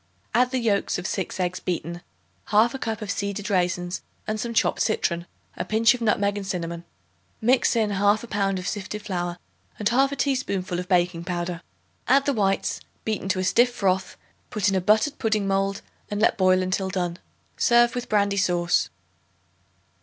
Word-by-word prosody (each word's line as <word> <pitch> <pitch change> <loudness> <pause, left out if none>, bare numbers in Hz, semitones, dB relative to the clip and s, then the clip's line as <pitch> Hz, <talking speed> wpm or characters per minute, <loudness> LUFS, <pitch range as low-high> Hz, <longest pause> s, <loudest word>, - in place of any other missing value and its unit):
Add 250 +1 +4
the 260 - -1
yolks 220 -5 +1
of 180 - -6
6 190 0 -3
eggs 180 0 -1
beaten, 170 -1 -4 0.5
1/2 230 +5 +3
cup 225 -1 -3
of 200 - -3
seeded 200 +1 -3
raisins 180 -1 0 0.2
and 215 0 -2
some 235 +1 -3
chopped 230 - +1
citron, 170 -5 0 0.3
a - - -3
pinch 225 +2 +4
of 250 - -6
nutmeg 205 -2 +1
and 195 -1 -5
cinnamon. 170 -2 -4 0.5
Mix 245 +2 +3
in 220 -2 +2
1/2 205 +3 +2
pound 195 -2 +1
of 180 0 -5
sifted 205 +1 -4
flour 175 -3 -3 0.4
and 210 - 0
1/2 270 +4 +2
teaspoonful 200 -11 -1
of 180 - -5
baking 175 -2 +1
powder. 175 -1 -3 0.5
Add 275 +2 +4
the 280 - +2
whites, 195 -4 0 0.3
beaten 215 -3 -2
to 190 - +1
a 185 - 0
stiff 235 +6 +4
froth; 190 -1 0 0.3
put 210 -2 +1
in - - 0
a 190 - +2
buttered 220 +10 +2
pudding 215 -3 +1
mold, 195 0 0 0.3
and 205 - -2
let 215 - +3
boil 185 -1 +3
until 190 +1 -1
done. 180 -2 -2 0.4
Serve 240 0 +4
with 245 0 -4
brandy 200 -1 +2
sauce. 175 -2 +2
200 Hz, 175 wpm, -25 LUFS, 180-220 Hz, 0.5 s, Add